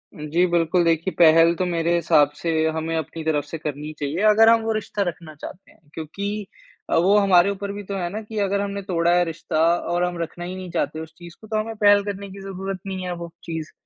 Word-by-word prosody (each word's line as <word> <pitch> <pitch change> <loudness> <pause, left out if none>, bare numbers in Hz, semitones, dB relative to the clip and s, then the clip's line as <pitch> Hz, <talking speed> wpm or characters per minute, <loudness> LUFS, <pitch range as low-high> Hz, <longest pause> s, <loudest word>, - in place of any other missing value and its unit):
जी, 155 +4 +1
बिल्कुल। 175 0 +2
देखिए 165 +2 +1
पहल 165 0 +6
तो 180 +2 -1
मेरे 170 -1 0
हिसाब 155 -3 +4
से 165 - 0 0.2
हमें 165 +1 -2
अपनी 160 +1 -5
तरफ 155 -2 0
से 160 +3 -7
करनी 150 0 -5
चाहिए 145 +4 -2
अगर 220 +2 +6
हम 230 0 +5
वो 225 - -1
रिश्ता 210 -1 -3
रखना 165 -2 -6
चाहते 175 +5 -11
हैं। - - -25
क्योंकि 200 +6 -5 0.4
अ, - - +1
वो 190 +5 +4
हमारे 195 -2 +5
ऊपर 200 0 -4
भी 205 - -6
तो 195 +1 -5
है 175 -2 -2
ना 215 +3 -5
कि 215 0 -8
अगर 200 0 0
हमने 200 0 -3
तोड़ा 170 -3 +1
है 180 - +4
रिश्ता 165 0 -4 0.4
और 175 0 +1
हम 180 0 -2
रखना 175 +1 -5
ही 185 - -5
नहीं 185 -1 -7
चाहते 150 +2 -2
उस 160 0 -9
चीज़ 170 -1 -11
को, 220 - -12
तो 215 0 -1
हमे 225 +1 -3
पहल 205 0 +6
करने 200 0 -5
की 195 - -10
ज़रूरत 195 0 -5
ही 190 - -3
नहीं 185 - -5
है 180 - -3
वो 170 0 -7
चीज़। 160 -2 -5
175 Hz, 240 wpm, -23 LUFS, 165-200 Hz, 0.4 s, पहल